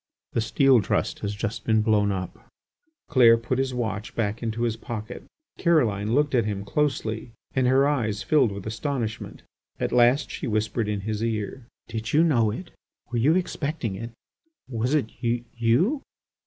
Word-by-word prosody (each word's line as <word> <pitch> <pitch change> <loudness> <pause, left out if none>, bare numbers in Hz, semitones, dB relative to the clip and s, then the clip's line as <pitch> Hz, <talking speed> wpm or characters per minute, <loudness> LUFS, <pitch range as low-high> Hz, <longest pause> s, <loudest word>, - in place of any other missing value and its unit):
"The 115 - +1
Steel 130 +2 +4
Trust - - -1
has 100 0 -3
just 110 +1 -4
been 110 -1 +2
blown 105 -2 +3
up." 95 -1 -5 0.6
Clair 115 -3 +6
put 120 +3 -2
his 135 -1 0
watch 110 -4 -3
back 110 -1 -1
into 115 0 -2
his 115 -2 0
pocket. 115 0 -7 0.4
Caroline 115 - +2
looked 145 0 +2
at 120 -3 +4
him 100 -2 -3
closely 115 -4 -1 0.2
and 130 -2 +2
her 135 +2 +4
eyes 110 -8 0
filled 135 -8 +3
with 100 -1 -7
astonishment. 115 0 -4 0.4
At - - -1
last 125 +4 +4
she - - -4
whispered 110 0 0
in 105 -2 -2
his 110 +2 -3
ear: 115 +2 -3 0.2
"Did 110 -1 -4
you 155 +3 +5
know 120 -10 +3
it? 125 - -6 0.4
Were 120 - 0
you 145 +8 +4
expecting 155 - -2
it? 115 +4 -6 0.6
Was 125 +3 0
it 125 -7 0
you 120 - +1
115 Hz, 165 wpm, -25 LUFS, 110-130 Hz, 0.6 s, Clair